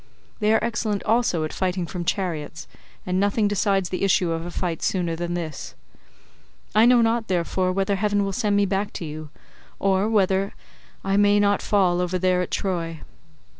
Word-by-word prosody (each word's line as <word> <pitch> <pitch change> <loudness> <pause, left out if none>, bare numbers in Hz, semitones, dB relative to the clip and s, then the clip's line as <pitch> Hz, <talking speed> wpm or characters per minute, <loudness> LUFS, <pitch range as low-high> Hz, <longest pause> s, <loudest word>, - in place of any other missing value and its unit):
They 215 -1 +2
are 220 - +3
excellent 225 -3 -1
also 220 -7 +1
at 155 - -4
fighting 185 -1 -1
from 175 0 -5
chariots, 160 -5 -3 0.4
and 185 0 0
nothing 205 +2 +2
decides 200 -2 +1
the 185 - -3
issue 185 -3 +2
of 165 +1 -3
a - - -5
fight 175 -2 -3
sooner 175 -3 0
than 175 +1 -3
this. 160 -5 -6 1.0
I 215 +3 +6
know 245 -1 +5
not, 225 0 0
therefore, 185 +1 0
whether 195 +1 0
heaven 205 0 +1
will 195 - -3
send 205 +2 0
me 205 0 +3
back 195 +1 -2
to 170 - -5
you, 155 0 -7 0.5
or 195 +2 +1
whether 195 -2 +1 0.5
I 195 0 +1
may 205 0 +4
not 205 0 +2
fall 180 -4 +2
over 180 +1 -1
there 180 0 +2
at 180 - -3
Troy. 165 -4 -3
190 Hz, 180 wpm, -23 LUFS, 175-205 Hz, 1.0 s, I